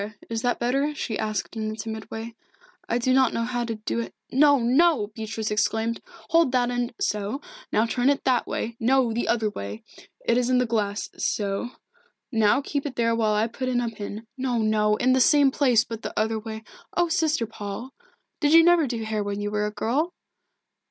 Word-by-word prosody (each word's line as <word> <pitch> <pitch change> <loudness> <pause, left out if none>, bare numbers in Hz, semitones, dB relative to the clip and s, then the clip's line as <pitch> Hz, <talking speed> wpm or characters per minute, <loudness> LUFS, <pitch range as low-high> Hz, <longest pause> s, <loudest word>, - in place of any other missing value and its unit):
Is 225 -1 -1
that 245 0 +1
better?" 275 +5 0
she 225 -6 -3
asked 215 0 -3
in 215 -1 -2
a 215 - -4
timid 220 0 -6
way. 225 +1 -6 0.6
"I 235 - +2
do 255 +1 +1
not 260 -2 +3
know 230 - 0
how 245 0 -2
to 230 -1 -3
do 215 +2 -3
it 230 - -5
" - - -34
"No, 285 +2 +5
no!" 250 -2 +3
Beatrice 220 0 -4
exclaimed. 225 +2 0 0.3
"Hold 330 -5 +4
that 245 -1 +2
end 245 0 -2
so 215 - -1 0.3
now 220 - +3
turn 245 +3 +1
it 280 - +1
that 255 -2 +2
way 230 0 -3
no, 245 0 +3
the 235 - -1
other 220 -3 +1
way 100 - -7 0.4
it 235 +1 +3
is 250 0 0
in 255 - +3
the 250 - +3
glass 210 -3 -2
so 200 +3 -1 0.6
now 220 +2 +3
keep 285 +1 -3
it 265 - -7
there 230 -1 +2
while 215 -2 +1
I 215 +1 +2
put 255 +3 -4
in 245 -1 +1
a 240 -1 -1
pin 210 +1 -7
no, 255 -2 -1
no 215 -1 +2
in 255 +4 +2
the 260 - +3
same 285 0 +5
place, 255 -5 +3
but 225 -1 -7
the - - -4
other 220 +1 0
way 220 0 -7 0.3
oh, 350 0 +3
Sister 320 -7 +1
Paul! 220 +4 -7 0.5
Did 295 -1 +3
you 330 0 +9
never 345 -3 +5
do 240 -1 -3
your 225 - -4
hair 215 -1 -1
when 200 0 -3
you 205 0 -3
were 210 0 0
a - - -4
girl?" 280 - -1
230 Hz, 215 wpm, -25 LUFS, 215-260 Hz, 0.6 s, you